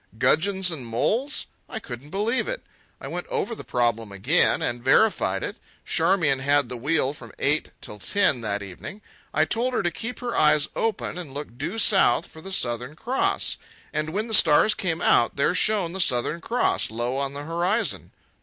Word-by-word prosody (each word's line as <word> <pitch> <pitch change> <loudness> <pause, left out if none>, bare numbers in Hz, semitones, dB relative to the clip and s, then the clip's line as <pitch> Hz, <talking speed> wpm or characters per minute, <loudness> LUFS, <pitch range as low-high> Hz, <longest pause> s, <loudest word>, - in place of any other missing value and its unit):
Gudgeons 180 - +3
and 150 -6 -5
moles! 220 - -1 0.2
I - - -5
couldn't 130 - -9
believe 215 +8 0
it. - - -4 0.4
I - - -8
went - - -5
over 460 - -2
the - - -8
problem 115 -3 -1
again, 100 -1 +2
and 120 0 -3
verified 200 +11 +3
it. - - -5 0.3
Charmian 160 -9 +2
had 140 -1 +2
the 125 - -4
wheel 140 +2 0
from 115 -6 -12
eight 150 +3 +1
till 105 - -8
ten 150 - +2
that 100 -2 -3
evening. 100 - -9 0.3
I - - +2
told 245 +2 -1
her - - 0
to 175 - +1
keep 235 +8 -6
her 240 -1 -4
eyes 150 -1 +4
open 215 -5 -2
and 145 -6 -8
look 145 -5 -6
due 160 - -4
south 215 -3 +4
for 160 - -13
the 195 - -9
Southern 125 -3 -2
Cross. 270 - 0 0.4
And 155 0 -1
when 210 +7 -2
the 225 - -5
stars 175 +3 +6
came 175 -5 -2
out, 120 - +3
there 140 +5 +2
shone 185 -3 +2
the 190 - -1
Southern 135 +3 +1
Cross 240 +8 0
low 120 +4 -2
on 140 0 -2
the 145 +1 -5
horizon. 175 +8 -1
160 Hz, 185 wpm, -24 LUFS, 125-210 Hz, 0.4 s, stars